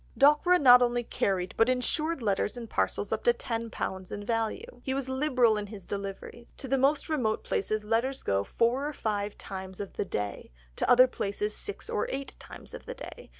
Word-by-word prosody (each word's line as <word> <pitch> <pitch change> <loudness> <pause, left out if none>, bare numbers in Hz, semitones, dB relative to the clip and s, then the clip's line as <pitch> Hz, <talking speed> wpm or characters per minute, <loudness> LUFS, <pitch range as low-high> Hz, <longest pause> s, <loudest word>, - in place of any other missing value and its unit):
Dockwra 300 +6 +5
not 250 -3 +8
only 240 0 +2
carried, 185 -5 -1
but 225 +2 +4
insured 300 +4 0
letters 205 +2 0
and 235 -1 -6
parcels - - -1
up - - -1
to 480 - +6
£10 225 -5 -4
in 205 0 -5
value. 230 - -2
He 265 - -2
was 275 -1 -2
liberal 260 -5 +2
in 205 -1 -4
his 200 -3 -10
deliveries. 200 +4 -7
"To 270 - -6
the 270 +1 +1
most 280 +2 +2
remote 250 -9 0
Places 215 +2 -1
Letters 235 +5 0
go 100 0 +1
four 240 - +1
or 300 - -4
five 205 -4 -2
times 190 -1 -7
of 200 -2 -6
the - - 0
day, 105 - -4 0.3
to - - 0
other 250 +1 +8
Places 210 -3 -3
six 410 - -5
or - - -1
eight 275 - -4
times - - -11
of - - -9
the - - -5
day. - - -10
235 Hz, 195 wpm, -29 LUFS, 205-270 Hz, 0.3 s, not